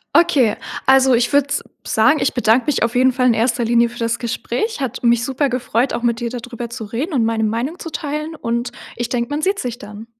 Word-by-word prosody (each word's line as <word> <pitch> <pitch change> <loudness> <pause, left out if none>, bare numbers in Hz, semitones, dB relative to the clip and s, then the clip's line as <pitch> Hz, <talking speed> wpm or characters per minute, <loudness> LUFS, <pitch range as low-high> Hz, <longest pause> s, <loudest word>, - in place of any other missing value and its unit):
Okay. 275 -11 +4 0.3
Also 265 -1 +5
ich 240 +4 +1
würde 285 -1 +4
s - - -1 0.2
sagen, 225 +8 +3
ich - - +1
bedanke 245 +1 +2
mich 295 - +1
auf 230 0 0
jeden 255 +1 +4
Fall 250 0 +1
in 240 - +5
erster 235 +2 +1
Linie 235 +1 +3
für 240 - -12
das 230 0 -1
Gespräch. 250 - -3
Hat 260 -4 -4
mich 235 -1 +3
super 270 +1 0
gefreut, 250 0 0
auch 240 - -3
mit 235 -1 +1
dir 240 -1 -2
da 245 - -5
drüber 240 0 -7
zu 235 -1 -7
reden 255 - -4
und 240 -5 +2
meine 225 0 0
Meinung 235 - -2
zu 330 - -6
teilen. 305 +1 -4
Und 235 -3 -2 0.2
ich 240 0 -3
denke, 235 -1 -1
man 295 +1 -1
sieht 390 +4 +1
sich 240 -1 -4
dann. 210 +1 -10
240 Hz, 240 wpm, -19 LUFS, 230-270 Hz, 0.3 s, Also